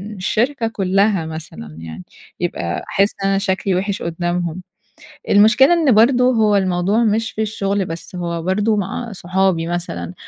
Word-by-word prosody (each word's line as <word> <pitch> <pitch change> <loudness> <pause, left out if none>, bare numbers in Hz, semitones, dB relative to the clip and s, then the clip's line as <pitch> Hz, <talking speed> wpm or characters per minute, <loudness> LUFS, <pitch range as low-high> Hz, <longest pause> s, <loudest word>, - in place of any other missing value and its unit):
الشركة 230 +6 0
كُلّها 195 -3 +1
مثلًا 155 - -8
يعني، 80 +2 -9 0.4
يبقى 85 -1 -3
أحس 200 +1 +2
إن 195 - +2
أنا 195 - +2
شكلي 195 -1 0
وِحِش 195 +2 -2
قدّامهم. 175 +1 -2 0.7
المشكلة 220 +9 +5
إن 325 -6 +3
برضه 245 +3 +4
هو 215 -4 +3
الموضوع 190 +3 +1
مش 220 0 0
في 220 - -4
الشغل 200 -2 -1
بس، 165 +2 -7
هو 170 -1 -3
برضه 205 +5 +1
مع 210 +4 -3
صحابي 185 -2 0
مثلًا، 130 - -4
195 Hz, 145 wpm, -19 LUFS, 175-215 Hz, 0.7 s, المشكلة